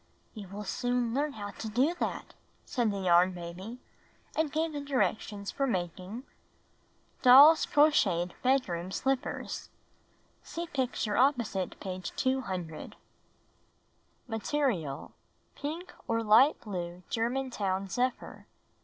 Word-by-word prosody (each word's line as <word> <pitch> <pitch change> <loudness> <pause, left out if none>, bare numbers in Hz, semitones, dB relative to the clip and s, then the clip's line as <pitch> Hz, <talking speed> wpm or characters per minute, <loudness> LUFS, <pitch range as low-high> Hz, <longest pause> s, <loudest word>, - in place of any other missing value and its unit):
"You 210 -4 -8
will 200 +3 -7
soon 245 +2 -1
learn 290 +2 0
how 205 -3 -6
to 220 - -6
do 260 +10 +2
that," - - -3 0.3
said 240 -5 0
the 200 -1 -3
Yarn 180 0 +4
Baby, 180 +7 -8 0.6
and 315 -2 +1
gave 315 +1 -1
the 290 - -3
directions 215 -7 -1
for 275 - -1
making 185 +2 -3 0.5
— - - -37
Doll's 280 +6 +8
Crocheted 180 - +3
Bedroom 200 -10 +1
Slippers 265 +7 -2 0.7
(See 340 - -5
picture 255 -8 -1
opposite 240 -8 +1
page 185 -2 -6
200) 190 -12 -2 1.3
Material: 225 - -2 0.4
Pink 330 +5 -6
or 230 0 0
light 225 +8 +6
blue 180 -4 -5
German 250 +3 -1
town 195 -3 -1
zephyr. 250 +5 -3
230 Hz, 115 wpm, -30 LUFS, 185-270 Hz, 1.3 s, Doll's